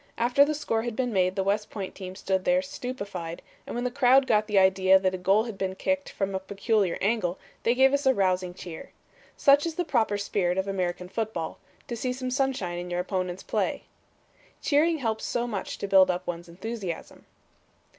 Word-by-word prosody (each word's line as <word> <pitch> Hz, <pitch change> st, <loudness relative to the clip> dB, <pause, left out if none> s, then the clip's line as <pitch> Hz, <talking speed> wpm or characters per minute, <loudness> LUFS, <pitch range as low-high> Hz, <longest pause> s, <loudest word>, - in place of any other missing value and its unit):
After 245 Hz, +4 st, +4 dB
the 305 Hz, +1 st, 0 dB
score 225 Hz, -6 st, -1 dB
had 235 Hz, -1 st, -4 dB
been 250 Hz, -2 st, -1 dB
made 185 Hz, -1 st, +2 dB
the 195 Hz, -, 0 dB
West 205 Hz, +2 st, 0 dB
Point 195 Hz, -3 st, -6 dB
team 185 Hz, -1 st, -8 dB
stood 190 Hz, -1 st, -1 dB
there 270 Hz, +4 st, +2 dB
stupefied, 200 Hz, -, -6 dB, 0.2 s
and -, -, -5 dB
when 240 Hz, -, -2 dB
the 250 Hz, -, -1 dB
crowd 265 Hz, 0 st, +5 dB
got 215 Hz, -4 st, +2 dB
the 210 Hz, -2 st, +1 dB
idea 190 Hz, 0 st, +5 dB
that 190 Hz, -1 st, 0 dB
a -, -, -2 dB
goal 195 Hz, +4 st, +3 dB
had 225 Hz, -5 st, -7 dB
been 190 Hz, -1 st, -2 dB
kicked 285 Hz, +7 st, -1 dB
from 195 Hz, 0 st, -3 dB
a 190 Hz, -, -1 dB
peculiar 200 Hz, 0 st, 0 dB
angle, 195 Hz, -4 st, 0 dB, 0.2 s
they 235 Hz, -, +2 dB
gave 265 Hz, +1 st, +5 dB
us 280 Hz, -1 st, +1 dB
a 265 Hz, -, +6 dB
rousing 185 Hz, -2 st, 0 dB
cheer. 175 Hz, -3 st, -9 dB, 0.5 s
Such 280 Hz, +1 st, +5 dB
is 325 Hz, -, -4 dB
the 355 Hz, -, -1 dB
proper 220 Hz, -8 st, +1 dB
spirit 190 Hz, -3 st, 0 dB
of 190 Hz, +1 st, 0 dB
American 180 Hz, -2 st, -2 dB
football; 195 Hz, -4 st, -4 dB, 0.3 s
to 240 Hz, -, -4 dB
see 250 Hz, +2 st, -2 dB
some 255 Hz, 0 st, -4 dB
sunshine 255 Hz, -10 st, -1 dB
in 175 Hz, 0 st, -6 dB
your 175 Hz, 0 st, -1 dB
opponent's 185 Hz, -1 st, -3 dB
play. -, -, -1 dB, 0.8 s
"Cheering 320 Hz, +3 st, +2 dB
helps 225 Hz, -5 st, -2 dB
so 240 Hz, -, -1 dB
much 210 Hz, -5 st, -4 dB
to 200 Hz, -, -4 dB
build 190 Hz, -1 st, +6 dB
up 180 Hz, 0 st, -1 dB
one's 170 Hz, 0 st, -5 dB
enthusiasm." 190 Hz, -1 st, -6 dB
200 Hz, 205 wpm, -27 LUFS, 185-250 Hz, 0.8 s, a